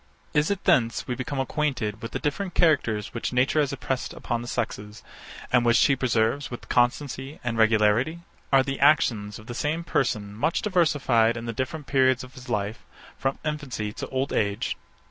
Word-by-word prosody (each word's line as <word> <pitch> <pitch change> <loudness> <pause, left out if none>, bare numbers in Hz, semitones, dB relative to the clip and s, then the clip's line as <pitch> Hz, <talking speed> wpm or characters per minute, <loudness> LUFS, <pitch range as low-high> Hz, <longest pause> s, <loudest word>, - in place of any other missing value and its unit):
Is 150 +1 +2
it 200 -1 -2
thence 120 -11 +2
we 125 - -1
become 135 +2 -4
acquainted 130 -6 -1
with 115 - -6
the - - -2
different 180 +5 -3
characters 135 - +2
which 115 - -3
nature 125 +5 +2
has 145 -3 +2
impressed 135 -1 -3
upon 120 0 -3
the 120 - -7
sexes, 105 -3 -4 0.5
and 125 -1 +5
which 120 0 +4
she 140 - +4
preserves 125 +3 0
with 120 - -8
constancy 135 +3 0
and 120 -1 -2
regularity? 110 +8 +3 0.3
Are 135 -1 +6
the 135 0 -4
actions 115 -8 +3
of 110 - -13
the 120 - -6
same 150 +6 -1
person 110 -10 -1
much 115 +10 0
diversified 140 - +2
in 120 - -6
the 115 - -3
different 145 +5 -4
periods 130 0 +3
of 130 +1 -12
his 130 0 -12
life, 105 0 -2 0.4
from 135 0 -1
infancy 135 -9 -3
to - - -6
old 135 +2 -2
age? 100 -1 0
130 Hz, 185 wpm, -25 LUFS, 115-145 Hz, 0.5 s, Are